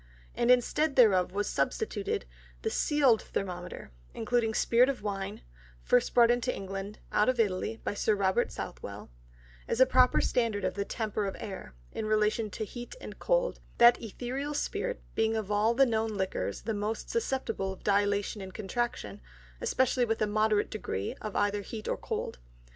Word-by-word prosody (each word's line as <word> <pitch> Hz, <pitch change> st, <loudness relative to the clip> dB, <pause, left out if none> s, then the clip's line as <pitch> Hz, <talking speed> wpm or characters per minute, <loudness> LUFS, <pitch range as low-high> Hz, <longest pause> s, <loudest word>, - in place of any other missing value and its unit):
And 240 Hz, -, 0 dB
instead 270 Hz, +4 st, +3 dB
thereof 200 Hz, -8 st, +5 dB
was 205 Hz, +2 st, -1 dB
substituted 430 Hz, -2 st, -1 dB, 0.4 s
the 445 Hz, -, 0 dB
seal'd 280 Hz, -, +3 dB
Thermometer, 180 Hz, -, -5 dB, 0.2 s
including 225 Hz, -1 st, 0 dB
Spirit 245 Hz, +3 st, +4 dB
of 265 Hz, -6 st, -3 dB
Wine 195 Hz, -1 st, -4 dB, 0.4 s
(first 245 Hz, -1 st, +2 dB
brought 240 Hz, -1 st, +7 dB
into 245 Hz, +1 st, +1 dB
England, 195 Hz, +1 st, -6 dB
out 210 Hz, +4 st, +3 dB
of 255 Hz, -2 st, 0 dB
Italy, 215 Hz, +1 st, 0 dB
by -, -, -1 dB
Sir 210 Hz, +1 st, +1 dB
Robert 190 Hz, -2 st, +1 dB
Southwell) -, -, -7 dB, 0.6 s
as -, -, -1 dB
a 260 Hz, -, +8 dB
proper 255 Hz, -1 st, +4 dB
Standard 230 Hz, -4 st, 0 dB
of -, -, 0 dB
the 200 Hz, 0 st, -2 dB
temper 215 Hz, -2 st, -2 dB
of 195 Hz, -, -4 dB
the -, -, -7 dB
Air, 190 Hz, -, -8 dB, 0.2 s
in 215 Hz, -, -4 dB
relation 215 Hz, +1 st, +1 dB
to 215 Hz, +2 st, -4 dB
Heat 240 Hz, -, -8 dB
and -, -, -9 dB
Cold; -, -, +1 dB, 0.2 s
that 240 Hz, 0 st, +7 dB
Ætherial 255 Hz, +6 st, -4 dB
Spirit -, -, -2 dB
being 225 Hz, 0 st, +1 dB
of 215 Hz, -2 st, -3 dB
all 215 Hz, +3 st, +3 dB
the 270 Hz, +2 st, +6 dB
known 225 Hz, -2 st, 0 dB
Liquors 190 Hz, -1 st, -2 dB
the 225 Hz, -, -2 dB
most 210 Hz, +2 st, -3 dB
susceptible 265 Hz, -, -1 dB
of 190 Hz, -, -15 dB
Dilatation 205 Hz, 0 st, +1 dB
and 190 Hz, -1 st, -9 dB
Contraction, 200 Hz, -, -3 dB, 0.4 s
especially 255 Hz, -1 st, +2 dB
with 225 Hz, -1 st, -1 dB
a 215 Hz, -, +2 dB
moderate 215 Hz, 0 st, +1 dB
degree 100 Hz, -, -3 dB
of 215 Hz, -2 st, -5 dB
either 205 Hz, 0 st, +1 dB
Heat 215 Hz, +2 st, -7 dB
or -, -, 0 dB
Cold. -, -, -4 dB
220 Hz, 170 wpm, -30 LUFS, 205-245 Hz, 0.6 s, a